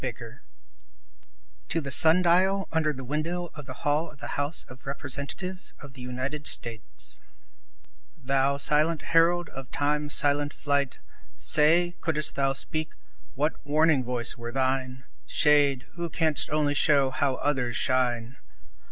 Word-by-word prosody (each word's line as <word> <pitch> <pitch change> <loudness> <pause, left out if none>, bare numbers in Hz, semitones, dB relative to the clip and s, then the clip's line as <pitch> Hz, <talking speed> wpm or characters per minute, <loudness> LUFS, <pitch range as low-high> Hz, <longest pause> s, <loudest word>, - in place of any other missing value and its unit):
Y - - -2
Z - - -12 1.3
To 165 - 0
The 140 -3 -5
Sun 165 +5 +8
Dial 190 +3 +2
UNDER 160 -2 0
the 135 -2 -8
Window 165 +6 -4
of 150 -4 -11
the 130 - -10
Hall 150 +3 0
of 150 - -17
the - - -8
House 145 +3 -2
of 130 +1 -15
Representatives 145 +8 -4
of 145 -2 -13
the 130 - -12
United 130 +4 -4
States 115 -2 -3 1.0
Thou 135 +1 0
silent 150 +2 +1
herald 170 +1 +2
of 135 -1 -10
Time's 145 +1 -1
silent 145 0 +1
flight! 140 -2 -1 0.4
Say, 175 +4 +4
could'st 155 -3 +1
thou 135 0 +1
speak, 155 +3 -3 0.4
what 150 +3 -2
warning 150 -1 +2
voice 120 -1 -1
were 120 -1 -8
thine? 130 0 -2 0.2
Shade, 145 -3 +2
who 170 -1 -5
canst 160 -2 0
only 150 -1 0
show 140 -2 +3
how 140 -1 0
others 130 -5 -1
shine! 125 -1 -1
145 Hz, 145 wpm, -26 LUFS, 130-155 Hz, 1.3 s, Sun